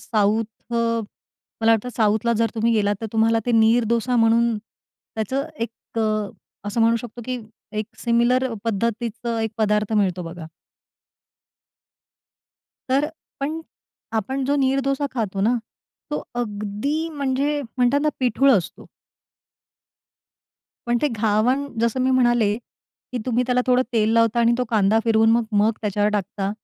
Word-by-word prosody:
South 215 0 +1 0.3
अ 230 0 +1 0.6
मला 225 0 +4
वाटतं 225 +2 0
साऊथला 220 +1 +2
जर 230 0 +1
तुम्ही 230 +1 +1
गेलात 205 -2 +2
तर 225 - -3
तुम्हाला 225 +1 +3
ते 245 - +1
नीर 225 +1 +4
डोसा 235 +2 +1
म्हणून 230 0 +3
त्याचं 225 +4 -6 0.2
एक 230 0 -6
अ, 215 -2 0 0.4
असं 230 +3 -1
म्हणू 230 +1 +4
शकतो 240 +1 -8
की 255 +1 -3 0.4
एक 215 - -5
सिमिलर 240 +2 +2
पद्धतीचं 230 +1 -2
1 220 0 -1
पदार्थ 210 0 +1
मिळतो 190 -4 +1
बघा. 165 -1 -8 2.4
तर 275 +3 +2 0.3
पण 305 +4 -2 0.6
आपण 265 +6 -3
जो 285 +2 +1
नीर 265 +1 +2
डोसा 275 +1 0
खातो 210 -6 -2
ना, 230 +5 +3 0.5
तो 295 - -2
अगदी 235 +7 -2
म्हणजे, 285 0 -1 0.2
म्हणतात 250 +3 +3
ना, 305 - +2
पिठूळ 265 +2 +3
असतो. 190 -8 -1 2.0
पण 240 0 +2
ते 300 - +3
घावण 230 +4 +1
जसं 235 +2 +1
मी 260 +1 +2
म्हणाले, 240 -5 +3 0.6
की 250 - -2
तुम्ही 245 0 +2
त्याला 250 0 +2
थोडं 250 0 +4
तेल 220 -1 +2
लावता 230 0 +3
आणि 235 0 +4
तो 250 - +1
कांदा 215 -1 +3
फिरवून 225 -1 +4
मग 230 +1 +3
मग 210 +2 +3
त्याच्यावर 210 0 0
टाकता, 200 -1 -2
230 Hz, 140 wpm, -22 LUFS, 215-250 Hz, 2.4 s, मला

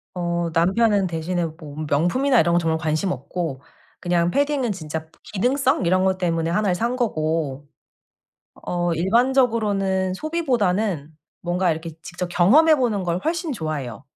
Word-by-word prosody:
어 170 -1 -1
남편은 195 +4 +3
대신에 170 +1 -2
뭐 155 -2 -9
명품이나 235 - +2
이런 170 +1 +1
거 - - +4
정말 160 -1 0
관심 155 +4 -1
없고 140 0 -4 0.4
그냥 175 -1 +1
패딩은 280 -3 +1
진짜 160 -3 -6 0.2
기능성 245 +1 0
이런 185 +2 +3
것 190 -1 +1
때문에 165 -2 0
1 205 +3 +1
를 180 - +2
산 235 +6 -1
거고 155 - -1 0.9
어 175 0 -2
일반적으로는 205 - +1
소비보다는 215 - -1 0.3
뭔가 175 0 +1
이렇게 165 +1 -4
직접 175 +1 -5
경험해 205 - +5
보는 230 -8 0
걸 175 0 -1
훨씬 330 -1 -1
좋아해요. 150 - -5
180 Hz, 305 characters per minute, -22 LUFS, 165-225 Hz, 0.9 s, 경험해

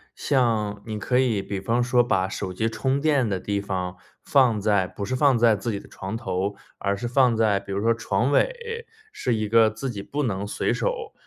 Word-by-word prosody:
像 110 -7 0
你 110 -2 -4
可 125 +4 0
以 120 -6 +1
比 100 0 -4
方 115 +5 +1
说 120 0 +3
把 95 -5 +1
手 95 -1 -4
机 110 +5 0
充 135 +4 -1
电 145 -5 +2
的 95 -3 -1
地 100 +2 -2
方 95 -2 -4 0.3
放 125 -6 +3
在 100 -3 +2
不 100 - -7
是 130 - -2
放 135 -2 +4
在 115 -2 +5
自 115 +4 -3
己 100 - -3
的 - - -14
床 95 +3 -6
头， 100 -3 -2 0.2
而 100 0 -1
是 120 +4 -4
放 125 -1 +3
在 110 -3 +2
比 100 0 -10
如 100 +1 -1
说 115 +1 +3
床 115 +3 0
尾， 470 - 0 0.3
是 125 - -1
一 110 -1 -1
个 115 -1 +5
自 110 +5 -5
己 100 -5 -5
不 145 +7 -3
能 100 -5 -2
随 105 - -1
手 475 -3 -2
110 Hz, 235 characters per minute, -24 LUFS, 100-125 Hz, 0.3 s, 在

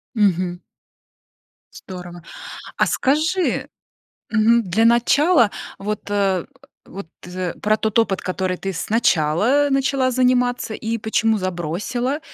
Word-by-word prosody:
Мгм. 185 -4 +1 1.1
Здорово! 175 -2 -10 0.5
А - - +2
скажи, 315 +7 0 0.6
мгм, 225 +2 +3
для 215 +6 +2
начала, 240 - +4 0.3
вот, 210 +1 -3
э 195 -3 0 0.4
вот, 195 -4 -9 0.2
э, 180 -1 -4
про 215 +1 +2
тот 220 0 0
опыт, 200 -4 +1
который 185 0 -2
ты 195 -1 -4
сначала 210 - +2
начала 270 -1 +1
заниматься, 250 -2 +1
и 225 +1 -3
почему 220 0 +1
забросила, 185 - -3
215 Hz, 105 wpm, -21 LUFS, 185-245 Hz, 1.1 s, начала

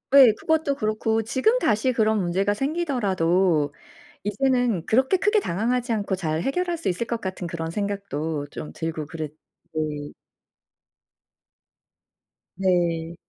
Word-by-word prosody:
예. 260 -5 +10
그것도 315 -3 +1
그렇고 220 -1 0
지금 260 - +2
다시 230 - +2
그런 220 -2 +2
문제가 190 +4 +1
생기더라도 190 - +1 0.5
이제는 235 -3 +1
그렇게 265 - +3
크게 420 +3 +3
당황하지 240 - -1
않고 205 -3 -1
잘 160 -3 -1
해결할 350 - -1
수 330 - -2
있을 190 +6 -1
것 235 -2 -2
같은 185 -2 -4
그런 165 -1 -4
생각도 165 -7 -3
좀 150 - -7
들고 160 -2 -4
그릇 155 -1 -6 0.4
네. 150 -2 -3 2.4
네. 170 -3 +1
205 Hz, 255 characters per minute, -24 LUFS, 165-250 Hz, 2.4 s, 예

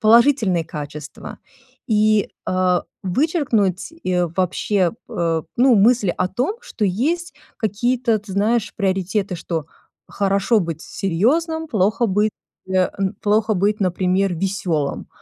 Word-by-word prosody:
положительные 225 - +4
качества? 150 -1 -8 0.5
И, 215 -1 +3 0.2
а, 185 -1 +1 0.2
вычеркнуть 225 - 0
и 180 -1 +1
вообще, 185 0 +1 0.2
п - - -11
э, 165 -2 0
ну, 250 0 +5
мысль 210 -2 +4
о - - -1
том, 255 - -1
что 245 - -4
есть 310 - -1 0.2
какие-то, 230 +2 0
ты 205 -1 -10
знаешь, 215 +3 +1
приоритеты, 195 -1 -1
что 165 -2 -4 0.4
хорошо 200 +3 +2
быть 165 -3 -4
серьёзным, 315 - 0
плохо 215 +2 +1
быть, 210 +2 +1 0.4
э, 185 -1 +2
н 195 -1 -1
плохо 215 +1 +2
быть, 205 +3 +1
например, 185 0 +1
весёлым. 170 -5 -2
200 Hz, 120 wpm, -21 LUFS, 185-230 Hz, 0.5 s, ну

